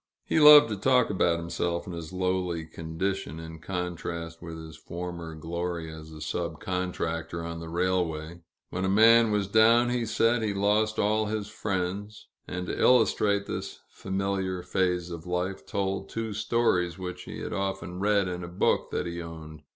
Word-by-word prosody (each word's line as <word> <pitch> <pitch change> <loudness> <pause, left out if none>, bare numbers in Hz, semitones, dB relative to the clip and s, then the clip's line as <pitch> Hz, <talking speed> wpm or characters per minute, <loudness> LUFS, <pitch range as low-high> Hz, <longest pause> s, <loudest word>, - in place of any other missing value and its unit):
He - - +2
loved 150 -1 +10
to 105 - -1
talk 125 +3 +3
about 90 -4 +2
himself 85 +1 -2
and 90 -3 -6
his 85 -1 -7
lowly 90 -3 -1
condition, 80 0 -4
in 80 0 -9
contrast 85 -1 -5
with 85 -1 -7
his 80 -1 -9
former 85 -2 -6
glory 85 0 -4
as 80 0 -10
a 80 -1 -10
sub 85 +1 -3
contractor 85 -2 -3
on 85 0 -5
the 85 0 -7
railway. 85 -2 -1 0.3
When 90 - -2
a 95 - +1
man 115 +3 +6
was 105 -2 +1
down, 115 +3 +5
he 120 -2 -1
said, 115 +1 +2
he 105 -2 -1
lost 105 +2 +2
all 110 +1 +2
his 105 -1 -3
friends 100 0 -4 0.2
and, 90 0 -4
to - - -3
illustrate 105 -4 +4
this - - -5
familiar 95 -1 -2
phase 90 -1 0
of 85 0 -7
life, 90 -2 -2
told 95 0 -2
two 115 -1 -3
stories 95 -6 +1
which 90 -1 -6
he - - -7
had - - -4
often 95 -2 -3
read 100 -1 +2
in 90 0 -4
a - - -5
book 85 +1 +1
that - - -2
he 85 0 -4
owned. 80 -2 -9
90 Hz, 175 wpm, -28 LUFS, 85-100 Hz, 0.3 s, loved